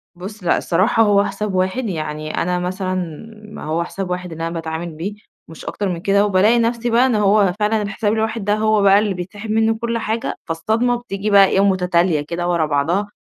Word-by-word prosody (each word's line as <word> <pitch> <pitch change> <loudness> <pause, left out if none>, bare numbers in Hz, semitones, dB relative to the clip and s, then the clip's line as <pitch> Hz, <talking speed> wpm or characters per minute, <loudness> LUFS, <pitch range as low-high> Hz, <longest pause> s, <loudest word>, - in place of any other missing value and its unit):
بُص 195 +3 -9
لأ، 170 - +2
الصراحة 200 +6 +2
هو 205 -1 +4
حساب 210 -3 -3
واحد. 190 +7 0
يعني 155 -2 -4
أنا 180 +1 0
مثلًا 185 +1 -3 0.6
ما - - -9
هو 160 +2 -1
حساب 190 +1 -5
واحد 180 -1 -4
اللي 165 +1 -4
أنا 165 - -5
باتعامل 165 +1 -4
بيه 190 +6 -4 0.3
مش 160 - -12
أكتر 200 -2 -3
من 170 -2 -3
كده، 200 +1 +3
وبالاقي 210 +4 +3
نفسي 235 +1 0
بقى 240 +3 +4
إن 245 -4 +1
هو 200 -2 +3
فعلًا 210 +1 +1
الحساب 205 +1 -1
الواحد 220 -1 -1
ده 205 - +2
هو 215 -1 +2
بقى 200 0 +6
اللي 210 -2 0
بيتسحب 200 +4 -6
منّه 225 0 +2
كل 235 0 -1
حاجة، 225 +2 -2
فالصدمة 220 +9 0
بتيجي 215 -4 -4
بقى 200 -1 +7
إيه، 190 - +1
مُتتالية 180 -4 +2
كدة 170 +3 -4
ورا 170 -3 +1
بعضها، 160 +8 0
195 Hz, 205 wpm, -19 LUFS, 175-215 Hz, 0.6 s, بقى